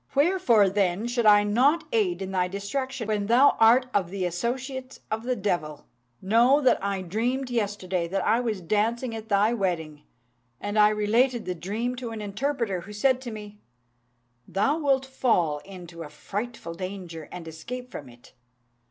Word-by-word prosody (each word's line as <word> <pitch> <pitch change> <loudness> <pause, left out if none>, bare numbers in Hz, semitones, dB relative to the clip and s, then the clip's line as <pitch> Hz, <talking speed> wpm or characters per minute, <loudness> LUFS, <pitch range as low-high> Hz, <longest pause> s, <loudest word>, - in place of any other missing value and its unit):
Wherefore, 280 - +4
then, 195 +1 0
should 240 -2 +1
I 205 0 +7
not 265 +10 +3
aid 195 -4 +1
in 190 - -5
thy 180 -1 +1
destruction 225 +6 -4
when 210 -2 -1
thou 250 +5 +5
art 235 +3 +6
of 185 -4 +1
the 190 -1 -3
associates 255 +8 -4
of 220 +1 -1
the 250 +2 -1
devil? 175 -8 -2 0.4
Know 235 +8 +4
that 260 -8 +2
I 200 -1 -2
dreamt 245 +8 -2
yesterday 195 -6 -1
that 195 +3 -2
I 230 - +3
was 225 -6 -2
dancing 225 +7 0
at 220 0 -8
thy 205 +3 +3
wedding, 165 -8 -2 0.6
and 205 +1 -2
I 210 0 +7
related 225 +3 +1
the 180 - -2
dream 210 +9 -3
to 245 -1 -5
an 225 -1 -6
interpreter, 215 -1 -2
who 205 +4 -11
said 260 +4 +2
to 255 - -6
me, 210 -1 -9 0.9
'Thou 275 +11 +1
wilt 270 -3 +2
fall 185 - +1
into 175 -3 -10
a 155 - -7
frightful 200 +4 -6
danger, 180 -3 -7
and 175 -2 -8
escape 250 +11 -7
from 140 -4 -8
it.' 120 0 -18
210 Hz, 170 wpm, -26 LUFS, 185-245 Hz, 0.9 s, I